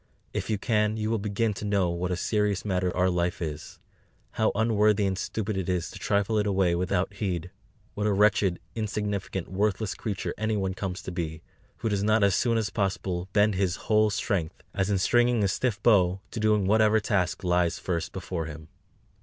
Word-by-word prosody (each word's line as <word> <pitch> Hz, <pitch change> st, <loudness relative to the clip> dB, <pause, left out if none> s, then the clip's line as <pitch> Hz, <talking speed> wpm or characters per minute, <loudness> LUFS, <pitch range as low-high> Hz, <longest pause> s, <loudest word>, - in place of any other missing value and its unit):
If -, -, -3 dB
you 110 Hz, -, +1 dB
can, 105 Hz, 0 st, +1 dB
you 110 Hz, 0 st, -1 dB
will 115 Hz, -, +1 dB
begin 105 Hz, +2 st, 0 dB
to 100 Hz, -, -7 dB
know 100 Hz, -4 st, +1 dB
what 85 Hz, +1 st, -2 dB
a 90 Hz, -, 0 dB
serious 105 Hz, +1 st, 0 dB
matter 90 Hz, -3 st, 0 dB
our 90 Hz, 0 st, +3 dB
Life 90 Hz, -1 st, 0 dB
is; 75 Hz, -3 st, -6 dB, 0.5 s
how 110 Hz, -, +1 dB
unworthy 105 Hz, -1 st, +3 dB
and 95 Hz, -1 st, 0 dB
stupid 105 Hz, +2 st, -3 dB
it 95 Hz, -1 st, -2 dB
is 90 Hz, -1 st, -1 dB
to -, -, -10 dB
trifle 100 Hz, +1 st, +1 dB
it 105 Hz, -, 0 dB
away 95 Hz, -3 st, +2 dB
without 90 Hz, +2 st, 0 dB
heed; 90 Hz, -4 st, -3 dB, 0.4 s
what 105 Hz, 0 st, -1 dB
a -, -, +2 dB
wretched, 100 Hz, -2 st, +3 dB
insignificant, 105 Hz, -4 st, -3 dB
worthless 100 Hz, +1 st, 0 dB
creature 100 Hz, -4 st, -4 dB
anyone 105 Hz, -3 st, 0 dB
comes 95 Hz, 0 st, -5 dB
to 95 Hz, -, -5 dB
be, 80 Hz, -3 st, -4 dB, 0.3 s
who 115 Hz, -, -2 dB
does 100 Hz, -2 st, 0 dB
not 110 Hz, 0 st, +3 dB
as 100 Hz, -1 st, +4 dB
soon 115 Hz, +4 st, +2 dB
as 110 Hz, -3 st, -1 dB
possible 95 Hz, -3 st, -2 dB
bend 105 Hz, +1 st, +3 dB
his 95 Hz, -2 st, 0 dB
whole 110 Hz, +4 st, +2 dB
strength, 100 Hz, -5 st, -2 dB
as 95 Hz, +1 st, 0 dB
in 100 Hz, -, +2 dB
stringing 120 Hz, +3 st, +3 dB
a -, -, +3 dB
stiff 105 Hz, +3 st, -1 dB
bow, 95 Hz, -5 st, +4 dB
to 115 Hz, -, -4 dB
doing 105 Hz, -2 st, +2 dB
whatever 110 Hz, +2 st, +4 dB
task 95 Hz, -2 st, 0 dB
lies 90 Hz, -1 st, +2 dB
first 85 Hz, -3 st, -3 dB
before 85 Hz, -3 st, -4 dB
him." 80 Hz, 0 st, -9 dB
100 Hz, 195 wpm, -27 LUFS, 90-105 Hz, 0.5 s, as